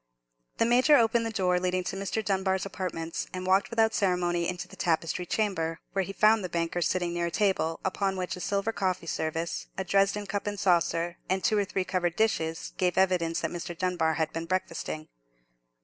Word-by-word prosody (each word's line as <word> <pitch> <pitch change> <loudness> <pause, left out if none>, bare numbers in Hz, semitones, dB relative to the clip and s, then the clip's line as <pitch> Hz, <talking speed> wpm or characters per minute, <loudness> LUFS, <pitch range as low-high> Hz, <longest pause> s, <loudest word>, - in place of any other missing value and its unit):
The 230 - +3
Major 250 +6 +5
opened 230 -1 +3
the - - -3
door 180 -4 +1
leading 185 0 0
to 185 - -4
Mr. 200 +3 -2
Dunbar's 190 -1 0
apartments, 175 -4 -4
and 185 0 -4
walked 190 +2 +3
without 225 -1 +2
ceremony 175 -3 +1
into 180 - -4
the - - -13
tapestried 170 0 -1
chamber, 165 -7 0
where 195 0 +1
he 195 - -5
found 215 +1 +4
the 180 - -3
banker 170 +1 -1
sitting 175 0 0
near 170 0 0
a - - -1
table, 180 -4 +1
upon 190 0 0
which 180 -1 -2
a - - -9
silver 200 +4 0
coffee 185 -5 -1
service, 165 +1 -2
a 190 - -1
Dresden 195 +2 +2
cup 205 +1 -3
and 205 -1 -3
saucer, 170 -1 +1
and 190 0 0
two 215 - +3
or 200 - +1
three 190 -1 -1
covered 175 -3 0
dishes 165 -7 0
gave 180 -1 +1
evidence 180 -3 +2
that - - -2
Mr. 175 -1 -5
Dunbar 175 -3 +1
had 160 -1 -1
been 165 0 -3
breakfasting. 165 -3 -3
185 Hz, 195 wpm, -28 LUFS, 170-195 Hz, -, Major